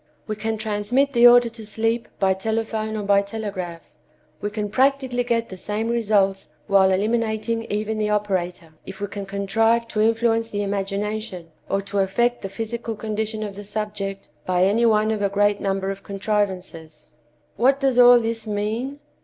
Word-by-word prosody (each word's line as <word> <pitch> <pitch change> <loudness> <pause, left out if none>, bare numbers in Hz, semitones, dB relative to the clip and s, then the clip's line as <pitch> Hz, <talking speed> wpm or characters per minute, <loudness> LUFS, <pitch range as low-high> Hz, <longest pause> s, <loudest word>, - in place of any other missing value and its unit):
We 215 - -3
can 220 +1 -2
transmit 220 +6 0
the 240 0 +7
order 240 0 +7
to 225 -1 -11
sleep 225 +2 -1
by 190 -1 +3
telephone 220 +2 -2
or 210 - -3
by 200 0 +4
telegraph. 200 -5 -5 0.6
We 205 - -1
can 210 -1 -4
practically 260 0 +2
get 230 -1 -1
the 185 - -8
same 210 +4 -3
results 205 -4 +1 0.2
while 195 -2 +4
eliminating 225 +3 0
even 215 +1 -2
the 210 0 0
operator, 185 -5 -2
if 195 - -8
we 205 - -2
can 200 -1 -7
contrive 225 +4 +1
to 215 -2 -1
influence 225 0 +2
the 205 0 -2
imagination 200 -2 -3 0.2
or 195 - +1
to 200 0 -3
affect 240 +6 +1
the 195 - -5
physical 225 +3 -4
condition 215 0 -3
of 205 -2 -5
the 205 - -8
subject 200 -3 -4
by 180 0 +1
any 220 +5 +3
one 215 0 +3
of 215 -2 -2
a 200 - +2
great 205 +1 +2
number 195 0 -1
of 195 0 -7
contrivances. 190 -6 -3 0.5
"What 270 +3 +3
does 265 -3 +2
all 245 0 +8
this 225 -1 -3
mean? 220 +7 -2
210 Hz, 170 wpm, -23 LUFS, 195-225 Hz, 0.6 s, all